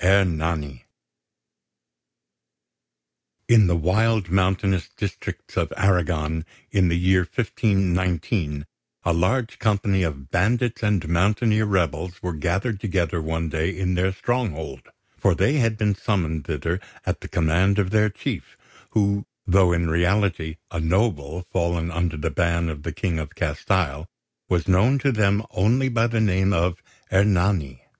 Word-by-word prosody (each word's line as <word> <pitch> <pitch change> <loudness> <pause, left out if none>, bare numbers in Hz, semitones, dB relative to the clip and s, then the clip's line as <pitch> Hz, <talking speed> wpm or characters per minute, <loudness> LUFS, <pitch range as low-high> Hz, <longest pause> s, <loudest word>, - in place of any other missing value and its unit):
ERNANI 80 -8 +1 2.6
In 110 -4 +6
the 85 - +2
wild 95 +3 +1
mountainous 95 0 +1
districts - - -5
of - - 0
Arragon, 80 -4 +1 0.3
in 95 -2 +3
the 85 - +1
year 90 +1 +3
1519, 90 - 0 0.4
a 85 - +1
large 110 +7 0
company 100 -3 +1
of 70 -4 -4
bandits 120 +5 +1
and 105 -7 +1
mountaineer 105 +6 +2
rebels 90 -2 -1
were 90 -1 -2
gathered 95 +7 -1
together 90 -5 -1
one 80 +1 -2
day 80 +2 -1
in 90 -1 0
their 90 +1 +1
stronghold; 100 -6 -3 0.3
for - - +3
they 145 - +2
had 115 -4 +1
been 105 -1 +1
summoned 85 -7 -1
thither 80 +3 -2 0.3
at - - -2
the - - -7
command 90 +4 +2
of 95 -2 +1
their 110 0 +3
chief, 100 - -5 0.3
who, 100 -1 +1 0.2
though 95 -2 +4
in 85 0 +1
reality 85 -1 +1
a 85 - -3
noble 85 -2 0
fallen 85 -2 -1
under 85 -1 -1
the 80 +2 -2
ban 85 +2 0
of 75 -2 -6
the - - -4
King 85 -4 -2
of 75 -2 -7
Castile, 80 -4 -1 0.4
was 90 -2 0
known 100 +9 +4
to 135 +1 +1
them 105 -2 +1
only 120 +8 +2
by 115 -1 +2
the 115 -1 -1
name 95 -1 +2
of 85 0 0 0.3
Ernani. 95 -9 +2
90 Hz, 140 wpm, -23 LUFS, 85-100 Hz, 2.6 s, In